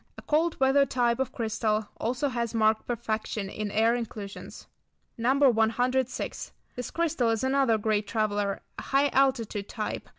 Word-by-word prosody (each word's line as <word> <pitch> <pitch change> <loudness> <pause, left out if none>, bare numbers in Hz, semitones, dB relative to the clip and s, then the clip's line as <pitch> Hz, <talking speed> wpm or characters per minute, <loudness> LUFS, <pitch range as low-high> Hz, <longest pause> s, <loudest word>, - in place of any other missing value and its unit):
A - - -10
cold 315 +2 +1
weather 270 +1 +5
type 245 -2 +1
of 265 - -1
crystal. 220 -2 -1
Also 255 +5 -1
has 235 -2 -2
marked 220 0 +2
perfection 220 -3 -3
in 210 +1 -4
air 225 +3 +3
inclusions. 215 -4 -6 0.5
No. 240 +3 +2
106. 250 +2 0 0.2
This 250 -1 -5
crystal 330 -8 0
is 225 +1 0
another 265 -3 +3
great 210 -1 0
traveller, 205 -2 -1 0.2
a - - -5
high 275 +1 +2
altitude 245 -7 +1
type. 215 -2 -4
230 Hz, 145 wpm, -27 LUFS, 215-260 Hz, 0.5 s, weather